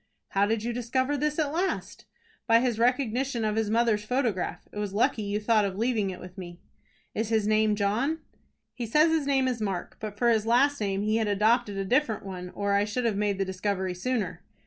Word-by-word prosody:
"How 200 Hz, +1 st, +2 dB
did 220 Hz, 0 st, 0 dB
you 240 Hz, +1 st, -2 dB
discover 260 Hz, +4 st, 0 dB
this 300 Hz, +1 st, -1 dB
at 300 Hz, -2 st, 0 dB
last?" 365 Hz, +4 st, -2 dB, 0.4 s
"By 230 Hz, -1 st, +6 dB
his 240 Hz, -2 st, 0 dB
recognition 250 Hz, 0 st, +1 dB
of 215 Hz, 0 st, 0 dB
his 220 Hz, -1 st, 0 dB
mother's 225 Hz, -2 st, +2 dB
photograph. 235 Hz, -4 st, -1 dB
It 210 Hz, -, -6 dB
was 205 Hz, -1 st, -3 dB
lucky 220 Hz, 0 st, +2 dB
you 205 Hz, 0 st, -2 dB
thought 215 Hz, 0 st, +3 dB
of 195 Hz, -1 st, -2 dB
leaving 225 Hz, -3 st, +1 dB
it 185 Hz, -1 st, -6 dB
with 180 Hz, +2 st, -10 dB
me." 175 Hz, -1 st, -9 dB, 0.5 s
"Is 220 Hz, 0 st, -2 dB
his 220 Hz, -2 st, +2 dB
name 215 Hz, 0 st, +3 dB
John?" 220 Hz, +10 st, 0 dB, 0.6 s
"He 240 Hz, -2 st, -5 dB
says 305 Hz, +8 st, +4 dB
his 315 Hz, -3 st, +1 dB
name 270 Hz, -2 st, +2 dB
is 245 Hz, -3 st, -2 dB
Mark, 195 Hz, -4 st, -3 dB
but 210 Hz, -1 st, -6 dB
for 240 Hz, +2 st, +3 dB
his 220 Hz, -1 st, +1 dB
last 270 Hz, +3 st, +3 dB
name 200 Hz, -1 st, -1 dB
he 215 Hz, +1 st, +1 dB
had 220 Hz, -1 st, 0 dB
adopted 210 Hz, +1 st, +2 dB
a 195 Hz, -, -2 dB
different 240 Hz, -2 st, +1 dB
one, 180 Hz, -2 st, -6 dB
or 200 Hz, 0 st, 0 dB
I 200 Hz, 0 st, +3 dB
should 225 Hz, +4 st, -2 dB
have 225 Hz, -3 st, +1 dB
made 205 Hz, -1 st, 0 dB
the 195 Hz, -, 0 dB
discovery 190 Hz, 0 st, -2 dB
sooner." 185 Hz, -3 st, -2 dB
220 Hz, 215 wpm, -27 LUFS, 200-245 Hz, 0.6 s, By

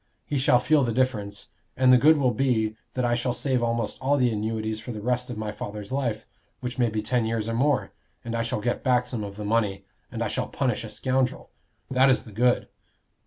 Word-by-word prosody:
He 145 Hz, -, -1 dB
shall 130 Hz, -1 st, +5 dB
feel 150 Hz, +2 st, +3 dB
the 120 Hz, -, 0 dB
difference. 110 Hz, -5 st, -1 dB, 0.3 s
And 130 Hz, 0 st, +6 dB
the -, -, +8 dB
good 155 Hz, +4 st, +6 dB
will 130 Hz, -4 st, +2 dB
be, 110 Hz, -3 st, +1 dB, 0.2 s
that 125 Hz, -1 st, 0 dB
I 120 Hz, -, +2 dB
shall 120 Hz, +1 st, 0 dB
save 130 Hz, 0 st, 0 dB
almost 115 Hz, -2 st, -1 dB
all 140 Hz, +2 st, +2 dB
the 125 Hz, -3 st, +3 dB
annuities 110 Hz, 0 st, -2 dB
for 115 Hz, +3 st, -7 dB
the 110 Hz, -, -6 dB
rest 125 Hz, +3 st, -1 dB
of 120 Hz, -, -5 dB
my 110 Hz, -1 st, -3 dB
father's 105 Hz, 0 st, -7 dB
life, 125 Hz, -5 st, -1 dB, 0.3 s
which 125 Hz, +1 st, -5 dB
may 120 Hz, -2 st, +3 dB
be 110 Hz, -1 st, -2 dB
ten 125 Hz, +1 st, +1 dB
years 110 Hz, -1 st, -1 dB
or 115 Hz, -, -2 dB
more, 135 Hz, +3 st, +1 dB, 0.3 s
and 115 Hz, -, -4 dB
I 115 Hz, -, 0 dB
shall 115 Hz, -2 st, -2 dB
get 120 Hz, +3 st, -1 dB
back 125 Hz, -2 st, +3 dB
some 120 Hz, -3 st, -4 dB
of 100 Hz, -1 st, -7 dB
the 105 Hz, 0 st, -6 dB
money, 105 Hz, -2 st, 0 dB, 0.3 s
and -, -, -2 dB
I -, -, 0 dB
shall -, -, -2 dB
punish -, -, -1 dB
a -, -, -7 dB
scoundrel. 130 Hz, 0 st, -1 dB, 0.4 s
That 130 Hz, +1 st, +5 dB
is 130 Hz, -, +3 dB
the 110 Hz, -, -12 dB
good." 120 Hz, +4 st, +2 dB
120 Hz, 230 wpm, -26 LUFS, 110-130 Hz, 0.4 s, the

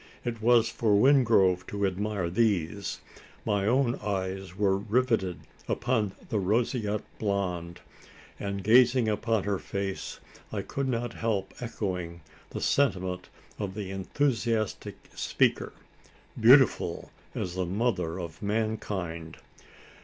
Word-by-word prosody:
It 115 Hz, -2 st, -3 dB
was 115 Hz, 0 st, +5 dB
for 110 Hz, -3 st, +1 dB
Wingrove 110 Hz, -7 st, +4 dB
to 100 Hz, 0 st, -1 dB
admire 100 Hz, -1 st, -1 dB
these. 100 Hz, -2 st, 0 dB, 0.4 s
My 100 Hz, -2 st, +1 dB
own 125 Hz, +1 st, +2 dB
eyes 95 Hz, -2 st, -3 dB
were 100 Hz, -2 st, +3 dB
riveted 105 Hz, -3 st, 0 dB, 0.3 s
upon 115 Hz, -5 st, 0 dB, 0.2 s
the 110 Hz, -, 0 dB
roseate 105 Hz, +1 st, 0 dB, 0.2 s
blonde; 90 Hz, -5 st, -2 dB, 0.6 s
and, 100 Hz, -1 st, -3 dB
gazing 120 Hz, +2 st, +5 dB
upon 110 Hz, 0 st, 0 dB
her 100 Hz, -2 st, -1 dB
face, 100 Hz, -1 st, -4 dB, 0.3 s
I -, -, -3 dB
could 140 Hz, -1 st, -3 dB
not 120 Hz, -2 st, -2 dB
help 105 Hz, -4 st, -2 dB
echoing 90 Hz, -7 st, -4 dB, 0.3 s
the -, -, -5 dB
sentiment 95 Hz, -9 st, +1 dB, 0.3 s
of 100 Hz, -3 st, -4 dB
the 100 Hz, -3 st, -5 dB
enthusiastic 115 Hz, +1 st, -1 dB, 0.2 s
speaker: -, -, +1 dB, 0.7 s
"Beautiful 120 Hz, -7 st, +5 dB, 0.2 s
as 90 Hz, -, -3 dB
the 90 Hz, -1 st, -2 dB
mother 95 Hz, -4 st, -1 dB
of 85 Hz, -3 st, -7 dB
mankind!" 100 Hz, -6 st, -3 dB
105 Hz, 115 wpm, -28 LUFS, 95-115 Hz, 0.7 s, was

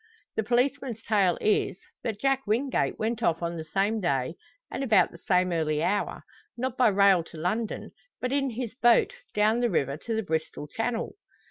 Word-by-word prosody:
The -, -, +1 dB
policeman's 245 Hz, 0 st, 0 dB
tale 195 Hz, -5 st, +2 dB
is, 210 Hz, -3 st, +1 dB, 0.2 s
that 220 Hz, -3 st, -3 dB
Jack 270 Hz, -1 st, +1 dB
Wingate 250 Hz, +6 st, 0 dB
went 225 Hz, +1 st, -2 dB
off 170 Hz, -5 st, +1 dB
on 170 Hz, 0 st, -2 dB
the 160 Hz, -, -5 dB
same 195 Hz, +7 st, 0 dB
day, 135 Hz, -5 st, 0 dB, 0.4 s
and -, -, -3 dB
about 215 Hz, -9 st, +4 dB
the 170 Hz, -, -13 dB
same 180 Hz, 0 st, +2 dB
early 155 Hz, -2 st, 0 dB
hour; 205 Hz, +4 st, -1 dB, 0.3 s
not 255 Hz, 0 st, -2 dB
by 255 Hz, -2 st, +4 dB
rail 200 Hz, -3 st, +5 dB
to 165 Hz, -, -12 dB
London, 210 Hz, +8 st, -2 dB, 0.3 s
but 250 Hz, -, -2 dB
in 275 Hz, -1 st, +1 dB
his 235 Hz, -1 st, -4 dB
boat, 240 Hz, -1 st, +4 dB, 0.2 s
down 215 Hz, +2 st, +3 dB
the 240 Hz, -1 st, +2 dB
river 140 Hz, -, 0 dB
to 225 Hz, +7 st, -4 dB
the 220 Hz, -, -1 dB
Bristol 160 Hz, -4 st, -3 dB
Channel! 225 Hz, -, -2 dB
215 Hz, 185 wpm, -27 LUFS, 175-240 Hz, 0.4 s, rail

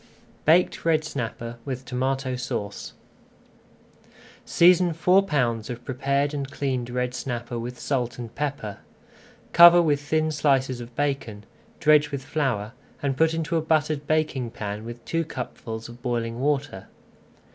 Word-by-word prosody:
BAKED 170 Hz, +4 st, +3 dB
RED 160 Hz, -2 st, +2 dB
SNAPPER 120 Hz, -5 st, -5 dB
WITH 130 Hz, 0 st, -5 dB
TOMATO 130 Hz, +1 st, -1 dB
SAUCE 105 Hz, -4 st, -5 dB, 1.5 s
Season 175 Hz, 0 st, +4 dB
four 180 Hz, +4 st, +4 dB
pounds 120 Hz, -, -1 dB
of 120 Hz, 0 st, -7 dB
prepared 140 Hz, +2 st, 0 dB
and 140 Hz, -2 st, -3 dB
cleaned 130 Hz, -3 st, -2 dB
red 125 Hz, 0 st, -2 dB
snapper 120 Hz, -2 st, -4 dB
with 120 Hz, +1 st, -6 dB
salt 125 Hz, -4 st, -2 dB
and 120 Hz, -2 st, -7 dB
pepper. 140 Hz, -8 st, -4 dB, 0.7 s
Cover 175 Hz, +1 st, +9 dB
with 150 Hz, -4 st, +2 dB
thin 155 Hz, +1 st, 0 dB
slices 135 Hz, -4 st, +1 dB
of 120 Hz, 0 st, -10 dB
bacon, 135 Hz, -8 st, -2 dB, 0.4 s
dredge 150 Hz, -1 st, +5 dB
with 140 Hz, -2 st, -5 dB
flour, 135 Hz, -8 st, -1 dB, 0.3 s
and 135 Hz, -2 st, 0 dB
put 160 Hz, +3 st, +2 dB
into 165 Hz, 0 st, -1 dB
a -, -, +1 dB
buttered 155 Hz, -2 st, 0 dB
baking 150 Hz, -6 st, 0 dB
pan 105 Hz, -1 st, -6 dB
with 120 Hz, 0 st, -9 dB
two 165 Hz, 0 st, 0 dB
cupfuls 115 Hz, -6 st, -6 dB
of 120 Hz, +1 st, -13 dB
boiling 120 Hz, -2 st, -2 dB
water. 140 Hz, -7 st, -1 dB
135 Hz, 140 wpm, -25 LUFS, 120-150 Hz, 1.5 s, Cover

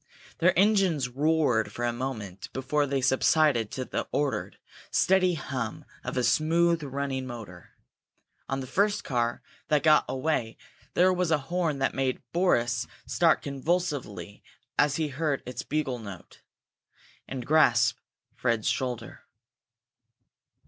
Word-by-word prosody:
Their 175 Hz, +2 st, +3 dB
engines 190 Hz, -9 st, +3 dB
roared 135 Hz, -6 st, +1 dB
for 120 Hz, -, -3 dB
a 120 Hz, -, 0 dB
moment 110 Hz, -7 st, -5 dB
before 145 Hz, +3 st, 0 dB
they 135 Hz, -1 st, 0 dB
subsided 130 Hz, -2 st, +3 dB
to 130 Hz, -, -3 dB
the -, -, -3 dB
ordered, 145 Hz, -2 st, -1 dB, 0.3 s
steady 185 Hz, -2 st, +3 dB
hum 130 Hz, -7 st, -4 dB, 0.2 s
of -, -, -4 dB
a 125 Hz, -, +2 dB
smooth 165 Hz, +6 st, +3 dB
running 135 Hz, -2 st, -3 dB
motor. 105 Hz, -8 st, -9 dB, 0.8 s
On 135 Hz, 0 st, -1 dB
the -, -, -5 dB
first 200 Hz, +9 st, +1 dB
car 120 Hz, -2 st, -1 dB, 0.2 s
that 150 Hz, -2 st, +2 dB
got 155 Hz, -1 st, +5 dB
away 130 Hz, -5 st, -1 dB, 0.4 s
there 185 Hz, +1 st, +5 dB
was 180 Hz, -2 st, 0 dB
a 160 Hz, -, +4 dB
horn 160 Hz, +1 st, -1 dB
that 135 Hz, 0 st, 0 dB
made 135 Hz, -1 st, -1 dB
Boris 125 Hz, -9 st, +2 dB, 0.2 s
start 165 Hz, -2 st, +2 dB
convulsively 140 Hz, -, -2 dB, 0.3 s
as 145 Hz, -1 st, +3 dB
he 155 Hz, -2 st, -1 dB
heard 145 Hz, 0 st, -1 dB
its 125 Hz, -, -5 dB
bugle 145 Hz, -4 st, -2 dB
note, 100 Hz, -5 st, -11 dB, 0.9 s
and 130 Hz, -2 st, -5 dB
grasp 120 Hz, -6 st, +4 dB, 0.3 s
Fred's 115 Hz, -3 st, 0 dB
shoulder. 120 Hz, 0 st, -3 dB
135 Hz, 130 wpm, -27 LUFS, 120-160 Hz, 0.9 s, got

